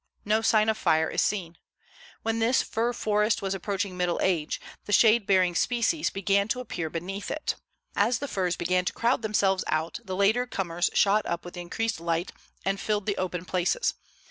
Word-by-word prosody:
No 215 +2 +2
sign 215 -1 +3
of 220 0 +1
fire 160 0 +2
is - - +1
seen. 175 -5 -2 0.6
When 225 0 0
this 230 +3 +3
fir 230 +2 -1
forest 210 -2 +1
was 195 0 -1
approaching 195 0 -3
middle 180 -1 0
age, 165 -5 0 0.3
the - - -6
shade 220 +1 +5
bearing 185 -2 +3
species 245 - +1
began 200 +1 +1
to 250 - -1
appear 175 -10 -4
beneath 185 +5 -5
it. 310 - -2 0.4
As 225 +4 +2
the 285 - -4
firs 180 -7 -1
began 180 +2 +1
to - - -1
crowd 235 +1 +1
themselves 200 -3 +1
out, 155 +2 -1
the 190 -1 -5
later 220 +6 +2
comers 175 -5 -1
shot 205 +2 +3
up 170 0 -3
with 175 - -8
the 175 - -6
increased 225 +4 -2
light 170 +1 -1 0.3
and 195 +1 0
filled 210 -1 -1
the 205 -2 -1
open 180 -1 -3
places. 185 - 0
195 Hz, 190 wpm, -27 LUFS, 180-220 Hz, 0.6 s, shade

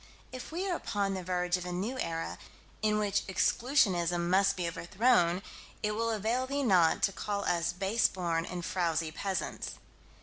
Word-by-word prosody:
If 255 +3 -8
we 360 +4 -2
are 360 - 0
upon 200 -9 -1
the 190 - -3
verge 180 0 0
of 180 - -7
a - - -4
new 210 +9 -3
era, 165 0 -3 0.4
in 215 0 +2
which 205 -1 +1
Exclusionism 185 - +2
must 195 +2 +4
be 175 -2 -1
overthrown, 180 +1 +2 0.4
it 210 - +1
will 230 +2 -1
avail 225 +4 0
thee 280 +1 -1
not 180 -9 +4
to - - +4
call 200 +1 -3
us 170 -1 +1
base 195 +5 +2
born 170 -3 -1
and 175 0 -5
frowsy 165 -4 0
peasants. 190 +3 -3
190 Hz, 170 wpm, -31 LUFS, 175-220 Hz, 0.4 s, must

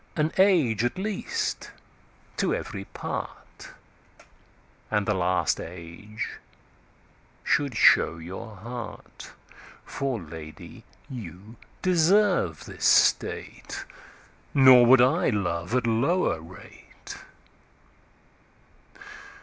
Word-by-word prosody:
An 155 0 0
Age 155 - +3
at 120 +9 -1
least 200 +1 -3 0.7
to - - +1
every 100 -1 -6
part, - - -7 1.2
And 105 -2 0
the 105 - +1
last 90 -1 0
Age 90 +6 -8 1.0
should 140 -6 0
show 85 - +5
your 95 +7 -9
Heart.For 120 +4 -8
Lady 80 -2 -11 0.2
you 105 -2 -10 0.3
deserve 180 - +2
this - - -6
State; - - +1 0.7
Nor 130 -3 +8
would 130 0 +7
I 125 +1 +3
love 90 -1 -2
at 125 -1 +1
lower 120 - +1
rate. 85 +3 -13
115 Hz, 85 wpm, -26 LUFS, 90-140 Hz, 1.2 s, Nor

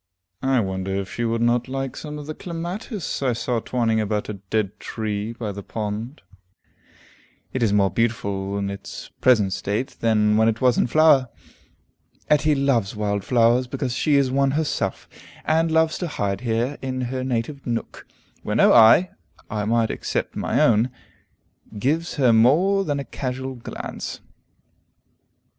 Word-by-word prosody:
I 135 -1 +2
wonder 95 -1 -3
if 100 -1 -4
she 120 - -2
would 115 0 0
not 120 +1 +2
like 135 0 -4
some 150 -1 -7
of 150 - -7
the 155 - -5
clematis 175 - -5
I 130 -3 +1
saw 120 +1 -1
twining 115 -2 0
about 105 0 -2
a - - -2 0.2
dead 105 -2 -1
tree 105 -1 -3
by 115 -3 -5
the 100 0 -7
pond. 110 +6 -5 1.3
It 130 - -2
is 110 -3 +3
more 100 -2 +3
beautiful 100 -4 -1
in 100 0 -2
its 100 0 -8
present 105 -7 +4
state 100 +6 -3
than 105 -2 +3
when 110 0 +4
it 115 0 0
was 125 -2 +3
in - - +2
flower. 145 -2 +4 1.0
Etty 150 0 +4
loves 130 -8 +1
wild 100 -1 -1
flowers 120 +2 +3
because 125 0 -3
she 145 +4 +2
is 135 -2 +3
one 135 +1 +2
herself, 155 -2 -2 0.4
and 160 +1 +2
loves 160 0 +2
to 175 - -2
hide 100 -9 -2
here 120 +3 -1
in 130 -1 -3
her 130 +1 -3
native 130 +3 -3
nook, 115 -1 -4 0.3
where - - -3
no - - +5
eye 115 +11 +7 0.4
(I 105 -1 -2
might 115 0 +1
except - - -3
my - - 0
own) 115 +2 +4 0.9
gives 155 +9 -1
her 130 -6 +4
more 165 - +4
than 145 -5 -1
a 140 - -5
casual 130 0 -4
glance. 120 -2 -7
120 Hz, 160 wpm, -23 LUFS, 105-140 Hz, 1.3 s, eye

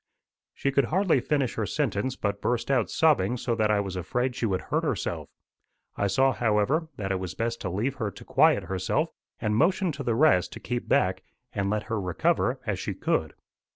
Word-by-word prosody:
She 140 - 0
could 140 -1 +3
hardly 180 0 +2
finish 135 0 0
her 110 -3 -2
sentence, 130 +1 -1
but 100 -3 -2
burst 125 +2 0
out 125 -5 +2
sobbing 125 -8 +3
so 120 0 -1
that 110 -2 +1
I 105 -1 +3
was 95 -2 -3
afraid 125 +8 -1
she 115 - -1
would 95 -3 -1
hurt - - -1
herself. - - -2 0.7
I 100 - 0
saw, 135 +8 +3
however, 120 +8 +1
that 95 -2 -3
it 95 - 0
was 90 -3 -5
best 115 +1 -2
to 95 - -2
leave 105 +9 -1
her 110 -5 -1
to - - -13
quiet 100 - +4
herself, 95 0 -1 0.3
and 105 0 0
motioned 175 - +2
to 140 0 -5
the 120 -3 0
rest 115 - +3
to - - -8
keep 120 -1 -4
back 95 0 +2 0.3
and 100 -1 -1
let 105 0 0
her 110 -2 -2
recover 90 -2 +1
as - - -2
she - - -3
could. - - -1
115 Hz, 205 wpm, -27 LUFS, 100-135 Hz, 0.7 s, quiet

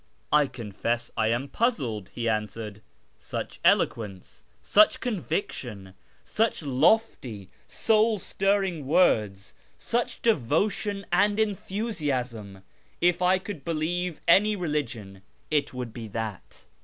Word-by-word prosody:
..." - - -39
" - - -8
I 145 - +1
confess 120 -1 -3
I 110 - +1
am 120 +5 0
puzzled," 130 - -1
he 120 -1 -2
answered. 105 -1 -3 0.2
" - - -40
Such - - -6
eloquence, 100 -5 +1 0.2
such 210 +1 +5
conviction, 135 - -4 0.3
such 220 -6 0
lofty, 135 - +1 0.2
soul 220 0 +2
stirring 195 -6 0
words, 105 - +2 0.2
such 240 +1 -2
devotion 200 - +1
and 205 +3 +3
enthusiasm! 145 - -2 0.4
If 175 +1 +2
I 180 +1 +4
could 185 -6 -7
believe 170 +2 -2
any 210 +5 +5
religion 120 - -3 0.3
it 150 -2 +1
would 125 -3 -6
be 115 -2 -7
that." 110 -2 -6
145 Hz, 120 wpm, -27 LUFS, -, 0.4 s, such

